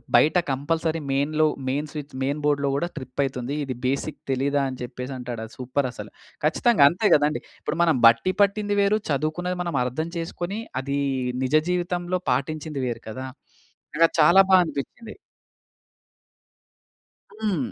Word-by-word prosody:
బయట 160 +4 +5
compulsory 160 +4 -1
మెయిన్‌లో, 155 +3 +2 0.2
main 145 +3 -1
switch 150 -2 -7
main 145 +3 -1
బోర్డ్‌లో 145 -1 +1
కూడా 170 +5 0
ట్రిప్ 130 -1 -8
అయితుంది. 130 +1 -3
ఇది 130 -2 -4
బేసిక్ 140 +3 -2
తెలీదా? 140 +2 +1
అని 130 - -8
చెప్పేసి 125 +2 -6
అంటాడు. 120 -2 -6
అది 110 - -14
సూపర్ 130 +2 -1
అసలు. 105 -3 -9 0.3
ఖచ్చితంగా 160 - +4
అంతే 185 +7 0
కదండీ! 150 +1 +1 0.2
ఇప్పుడు - - -3
మనం 165 -5 +3
బట్టి 115 +11 +3
పట్టింది 205 +1 +2
వేరు. 205 +2 +3
చదువుకున్నది 155 +6 -1
మనం 170 -4 -3
అర్థం 145 +7 -3
చేసుకొని 175 +4 -4 0.2
అది 140 +1 -2 0.4
నిజ 130 +2 -2 0.2
జీవితంలో 180 0 -1
పాటించింది 145 +2 -2
వేరు 120 - -4
కదా! 130 +4 -6 0.7
నాకు 165 - +6
చాలా 170 +6 +7
బా 190 - +7
అనిపిచ్చింది. 160 - -6 2.3
హ్మ్. 180 - -1
150 Hz, 140 wpm, -24 LUFS, 130-175 Hz, 2.3 s, చాలా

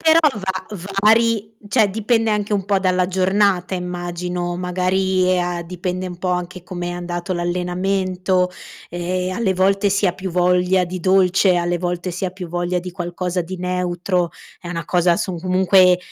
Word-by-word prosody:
Però 320 0 +5 0.2
va 190 -2 -3 0.4
vari, 220 0 +3
cioè 215 0 +3
dipende 225 +2 +1
anche 210 0 0
un 195 -2 0
po' 200 -1 +2
dalla 185 -1 +1
giornata 190 0 +1
immagino, 175 0 -3
magari, 185 +1 +1
ehm, 180 -1 +2
a 175 -1 -3
dipende 180 +1 -4
un 180 -1 -6
po' 180 0 -2
anche 180 0 -3
come 175 -1 -5
è - - -3
andato 175 +1 -4
l'allenamento, 180 +1 0 0.4
e 180 +1 -2
alle 195 -1 0
volte 195 +2 +2
si 200 +1 +1
ha 180 - +2
più 190 +1 -5
voglia 180 +1 +2
di 180 +1 -5
dolce, 185 +1 +4
alle 175 0 0
volte 180 0 -2
si 180 +2 -3
ha - - -1
più 180 -1 -8
voglia 175 +1 -1
di 180 +1 -7
qualcosa 175 0 -3
di 185 +2 -7
neutro, 180 0 -1 0.3
è 175 - -8
una 170 -1 -4
cosa 175 -1 +3
asso 185 +2 -2
comunque 185 +1 +4
180 Hz, 170 wpm, -20 LUFS, 175-190 Hz, 0.4 s, Però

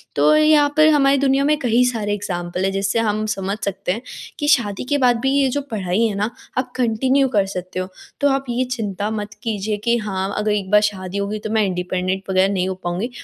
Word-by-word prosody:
तो 305 - +4
यहाँ 305 -1 +5
पर 310 0 +7
हमारी 275 -1 +4
दुनिया 275 0 +2
में 300 0 +3
कहीं 245 0 +2
सारे 220 -4 -1
एग्ज़ाम्पल 180 -3 -3
हैं, 195 - +1
जिससे 195 +3 0
हम 215 -1 0
समझ 200 -1 -2
सकते 195 -1 -2
हैं 215 +5 -3 0.4
कि 295 - -1
शादी 225 -9 +2
के 290 - +2
बाद 245 -3 +3
भी 265 +2 0
ये 275 -1 +3
जो 285 +3 -1
पढ़ाई 190 -1 -1
है 205 - -3
ना, 210 +3 -1 0.3
आप 255 -1 -1
कंटिन्यू 255 +3 +2
कर 200 -1 +4
सकते 185 -1 -5
हो। 185 - -3 0.3
तो 285 - +4
आप 270 0 0
ये 240 +2 0
चिंता 210 -3 -2
मत 210 -1 -4
कीजिए 215 -2 -2
कि 235 0 +3
हाँ, 195 -2 -3
अगर 210 0 0
एक 200 -2 -1
बार 210 0 +6
शादी 185 -1 -7
हो 200 - -1
गई 210 +1 -4
तो 215 - -6
मैं 220 -1 +2
इंडिपेंडेंट 185 +1 -2
वग़ैरह 190 +1 +2
नहीं 185 -1 0
हो 190 - -3
पाऊँगी। 180 +8 -2
210 Hz, 230 wpm, -20 LUFS, 195-255 Hz, 0.4 s, पर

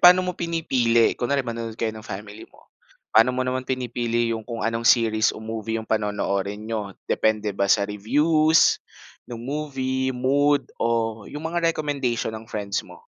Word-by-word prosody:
paano 180 +1 +8
mo 180 - -1
pinipili? 130 -10 +2
Kunwari 135 +2 -1
manonood 115 -2 -5
kayo 115 -2 -1
ng 110 - -9
family 105 0 -8
mo, - - -23 0.4
paano 125 +3 +5
mo 130 - 0
naman 130 0 -2
pinipili 120 -2 -1
yung 115 - -3
kung 115 -2 -4
anong 115 0 +1
series 110 -2 +4
o 110 - -9
movie 110 0 -3
yung 110 - -4
panonoorin 105 -2 -1
niyo? 105 -4 -4
Depende 110 -1 +1
ba 100 0 0
sa 100 0 +4
reviews 150 +10 +3 0.5
nung 120 -1 -7
movie, 130 -2 -2
mood, 140 +3 +1
o 115 -2 0
yung 150 +2 -7
mga 170 +1 +1
recommendation 140 -8 -1
ng 110 0 -9
friends 100 -2 -2
mo? - - -15
115 Hz, 165 wpm, -24 LUFS, 110-135 Hz, 0.5 s, paano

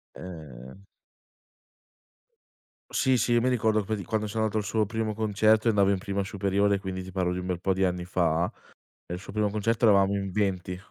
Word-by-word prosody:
Ehm 80 -1 -10 2.1
Sì, 130 -2 +2
sì, 120 +1 +1
io 120 - +4
mi 130 - +2
ricordo 110 -3 +2
qua 110 +3 -2
di 100 - -6
quando 110 -2 -1
sono 110 +1 -1
andato 110 0 0
al - - -3
suo 110 +1 +1
primo 110 0 -2
concerto 110 +1 +2
e - - +5
andavo 100 -2 +3
in 100 - +1
prima 100 +1 -2
superiore, 100 +1 +1
quindi 95 -1 -5
ti 95 - -9
parlo 90 -1 0
di 90 - -3
un 90 - -5
bel 90 -2 -2
po' 95 +1 +1
di 95 - 0
anni 90 -1 0
fa 85 -1 +1 0.6
e - - -6
il 90 - -4
suo 95 - -9
primo 105 0 0
concerto 110 +3 0
eravamo 100 -2 +5
in 95 -1 -3
20. 95 -2 -1
100 Hz, 210 wpm, -27 LUFS, 90-110 Hz, 2.1 s, e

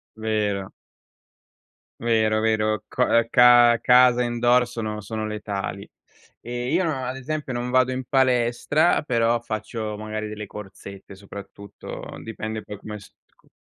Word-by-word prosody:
Vero. 105 -3 -2 1.3
Vero, 110 -2 +2
vero. 110 -1 0
Co 125 - 0
ehm 115 0 +3
ca 120 -1 +7
casa 125 0 +5
indoor 120 +1 +2
sono, 110 -3 -5
sono 110 +2 -4
letali. 100 -2 -5 0.5
E 120 +2 -4
io 175 +2 +2
non, 160 - 0
ad 130 +1 -4
esempio 150 +1 -4
non 125 0 -3
vado 130 0 +3
in 130 -1 -4
palestra, 130 +4 +2
però 120 -4 +1
faccio 110 -1 -5
magari 110 0 -5
delle 105 0 -6
corsette 100 -1 -10
soprattutto, 100 +1 -10 0.2
dipende 110 -1 -5
poi 105 - -8
come 105 0 -8
st - - -17 0.2
co - - -30
115 Hz, 135 wpm, -23 LUFS, 105-125 Hz, 1.3 s, ca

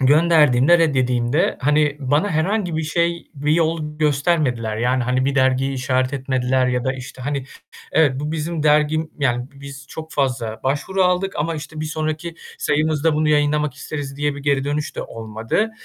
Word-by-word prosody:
gönderdiğimde, 150 0 +5
red 160 -4 +2
yediğimde, 125 -2 +1
hani, 150 +1 +2
bana 145 +9 +1
herhangi 175 +2 0
bir 160 - -1
şey, 170 +2 -1
bir 145 +2 0
yol 160 -2 0
göstermediler 140 -7 +1
yani, 125 +3 +1
hani, 125 +2 0
bir 140 +1 0
dergiyi 130 0 +2
işaret 130 0 0
etmediler 130 -1 0
ya 125 -1 0
da, 130 - +1
işte, 130 0 -9
hani, 140 0 -2 0.5
evet 140 -4 +3
bu 150 +1 -3
bizim 160 0 -3
dergim 150 +1 +2
yani, 125 -3 0
biz 140 0 -10
çok 160 0 -8
fazla 120 -5 -1
başvuru 150 +8 0
aldık 180 +1 +1
ama, 165 +3 -1
işte, 155 0 -7
bir 155 - -2
sonraki 155 +2 -3 0.2
sayımızda 155 +1 +1
bunu 155 0 +1
yayınlamak 150 -1 +2
isteriz, 145 -1 -6
diye 145 0 0
bir 145 - -7
geri 140 -1 +1
dönüş 145 +1 -3
de - - -2
olmadı. 115 - -2
145 Hz, 170 wpm, -21 LUFS, 130-155 Hz, 0.5 s, gönderdiğimde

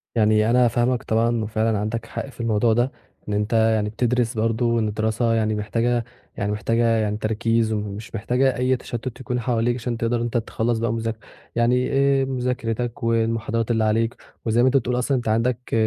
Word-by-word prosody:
يعني 110 0 +3
أنا 125 0 +5
فاهمك 120 +1 +1
طبعًا 115 0 +1
وفعلًا 110 0 0
عندك 110 +2 -3
حق - - -6
في 125 - -17
الموضوع 115 0 +2
ده، 120 +3 +1 0.4
إن 105 - -1
أنت 105 +2 -1
يعني 110 -2 +3
بتدرس 120 +1 0
برضه 115 +2 +1
وإن 115 -2 +1
الدراسة 110 +2 0
يعني 110 -1 +1
محتاجة 115 +3 0 0.3
يعني 100 +1 -1
محتاجة 115 +3 0
يعني 110 -2 +1
تركيز 110 +1 0
مش 105 +2 -5
محتاجة 125 +4 +1
أي 130 +1 +2
تشتت 120 0 -6
يكون 125 -1 -2
حواليك 120 0 0
عشان 120 -1 -3
تقدر 115 +1 0
إن - - -3
أنت 120 0 -1
تخلص 115 0 -1
بقى 115 0 0
مذاك 115 -1 -3 0.4
يعني 125 +2 +2
آآ، 135 0 +3
مذاكرتك 125 -3 -2
والمحاضرات 115 0 0
اللي 110 -1 +2
عليك 115 +2 +1 0.3
وزي 115 +1 +2
ما 130 - +5
أنت 135 - +4
بتقول 125 0 0
أصلًا 130 +1 +1
أنت 120 - -4
عندك 120 +3 0
115 Hz, 185 wpm, -23 LUFS, 110-120 Hz, 0.4 s, أنا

